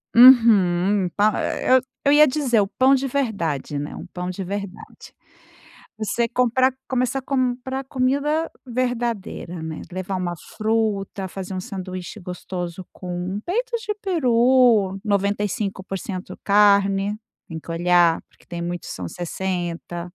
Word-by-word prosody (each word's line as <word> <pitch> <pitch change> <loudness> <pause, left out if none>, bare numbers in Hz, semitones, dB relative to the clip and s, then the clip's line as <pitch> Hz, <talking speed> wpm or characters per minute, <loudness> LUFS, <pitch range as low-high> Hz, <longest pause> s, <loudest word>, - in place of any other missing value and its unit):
Uhum, 205 -6 +6
pa 210 +1 +3 0.7
eu 280 - +5
ia 300 +1 +7
dizer 255 -6 +2
o 195 - 0
pão 265 +6 +4
de 270 +1 -1
verdade, 180 - -2
né, 145 +1 -5
um - - -8
pão 180 0 -4
de 185 +1 -4
verdade. 200 0 -7 0.8
Você 230 +2 0
comprar, 250 +1 +2
começar 255 +1 0
a - - -12
comprar 260 0 -1
comida 285 +5 0 0.2
verdadeira, 235 -8 -3
né, 160 -1 -5
levar 185 +1 -4
uma 175 -1 -2 0.2
fruta, 215 -3 -1
fazer 190 0 -7
um - - -2
sanduíche 185 -2 -7
gostoso 180 0 -6
com 180 +2 -4
peito 475 +8 -1
de 420 - -1
peru, 245 - +3
95% 200 -1 -2
carne, 200 0 +4 0.3
tem 160 -1 -6
que 165 - -9
olhar 175 0 +3
porque - - -26
tem 170 0 -6
muitos 175 0 -4
que - - -5
são 90 -2 -5
60. 175 -1 -4
200 Hz, 130 wpm, -22 LUFS, 180-250 Hz, 0.8 s, ia